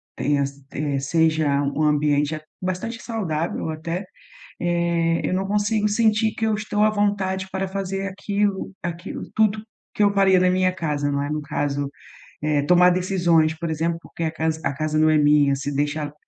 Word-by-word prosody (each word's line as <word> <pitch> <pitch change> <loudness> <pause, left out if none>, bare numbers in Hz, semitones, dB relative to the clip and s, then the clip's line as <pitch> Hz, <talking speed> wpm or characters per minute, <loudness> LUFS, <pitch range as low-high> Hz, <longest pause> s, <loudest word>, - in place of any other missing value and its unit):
tenha 140 +2 +1
s 140 0 -6
eh, 145 -1 -2
seja 155 -1 +2
um 140 +2 -1
ambiente 150 0 +2 0.2
bastante 185 +6 -3
saudável 170 -9 -2
até, 165 +4 -4 0.6
eh, 170 -1 +1
eu - - 0
não 190 +1 -1
consigo 210 +1 +1
sentir 220 0 +2
que 225 - -1
eu 220 - +1
estou 210 0 -1
à 215 - +6
vontade 200 -2 0
para 190 0 -2
fazer 195 0 -3
aquilo 200 0 -2
aquilo 175 +2 -5
tudo 215 -1 +2 0.3
que 210 - 0
eu 205 - +5
faria 190 -2 +4
na 185 - +4
minha 185 0 +2
casa, 150 -5 -2
né. 140 0 -1
No 150 0 -2
caso, 145 -1 -2 0.5
é 150 -1 +2
tomar 180 +4 +5
decisões, 175 -3 +2
por 165 0 -4
exemplo, 165 +2 -1
porque 165 - -7
a 160 - +1
casa 160 0 -1
a 140 - 0
casa 155 +2 -2
não 155 0 +4
é 155 - +4
minha, 145 -1 +4
se 140 +1 -4
deixar, 145 +1 -1
170 Hz, 175 wpm, -23 LUFS, 150-195 Hz, 0.6 s, à